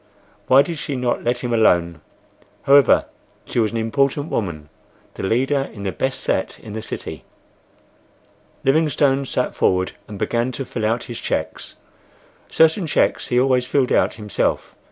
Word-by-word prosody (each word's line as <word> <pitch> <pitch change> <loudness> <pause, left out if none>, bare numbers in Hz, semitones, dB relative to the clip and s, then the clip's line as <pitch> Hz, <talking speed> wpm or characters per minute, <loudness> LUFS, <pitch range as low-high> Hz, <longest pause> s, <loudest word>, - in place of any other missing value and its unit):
Why 135 +2 +6
did 165 +1 -5
she 140 +1 -4
not 125 -1 -1
let 120 +1 -1
him 120 -1 -1
alone! 85 -8 +2 0.6
However, 140 -2 +5 0.4
she - - -2
was 110 -2 +2
an 115 - -4
important 140 +6 0
woman—the 80 -8 -7
leader 135 +7 0
in 100 -3 -9
the 95 - -2
best 130 +8 -2
set 95 - -1
in 110 -2 -10
the 110 - -4
city. 110 - -7 1.4
Livingstone 140 -2 +2
sat 125 - -1
forward 95 0 +1 0.2
and 105 - -8
began 120 +5 -1
to 135 - -5
fill 110 -3 -2
out 115 +2 -1
his 120 - -7
cheques. - - -4 0.7
Certain 160 +2 +3
cheques - - +1
he 125 - +2
always 125 -1 +2
filled 130 -1 +1
out - - +2
himself. 105 -2 -2
125 Hz, 155 wpm, -21 LUFS, 110-135 Hz, 1.4 s, Why